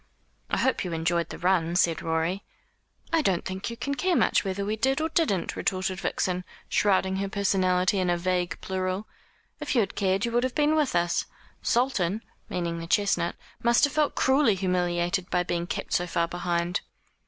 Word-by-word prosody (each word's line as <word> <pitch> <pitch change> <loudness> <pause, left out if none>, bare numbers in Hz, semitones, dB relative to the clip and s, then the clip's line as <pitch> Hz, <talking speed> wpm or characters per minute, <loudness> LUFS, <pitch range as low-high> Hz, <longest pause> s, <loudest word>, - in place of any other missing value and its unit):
"I - - 0
hope 260 - +1
you 180 -2 -4
enjoyed 165 +1 0
the - - -7
run," 175 -2 +1
said 170 -2 +2
Rorie. 165 +5 -1 0.7
"I 325 - +4
don't 190 - 0
think 190 +3 -4
you 235 - -7
can 280 - -2
care 360 +5 +1
much - - +3
whether 195 +1 -2
we 210 +2 -1
did 265 +5 +1
or 320 +1 0
didn't," 305 - 0
retorted 185 0 -1
Vixen, 180 -1 -1 0.2
shrouding 190 -2 +2
her 195 0 -2
personality 190 -1 +2
in 180 -1 +1
a 175 - +2
vague 180 0 -1
plural. 185 +2 -2 0.5
"If 295 -2 -2
you 235 - +5
had 200 - -2
cared 195 +2 +1
you 235 - -2
would 240 +1 +2
have 255 -1 -2
been 300 0 +3
with 300 -3 +1
us. 170 0 +1 0.3
Sultan," 230 -5 +1 0.3
meaning 170 -1 -2
the 165 - -6
chestnut 175 -2 +1 0.3
"must 235 0 +3
have 285 -1 +4
felt 300 -1 +1
cruelly 265 -5 +3
humiliated 180 -1 0
by 180 0 +1
being 175 -1 -2
kept - - -4
so 180 - +1
far 170 0 0
behind." 175 +1 -1
185 Hz, 190 wpm, -27 LUFS, 175-230 Hz, 0.7 s, you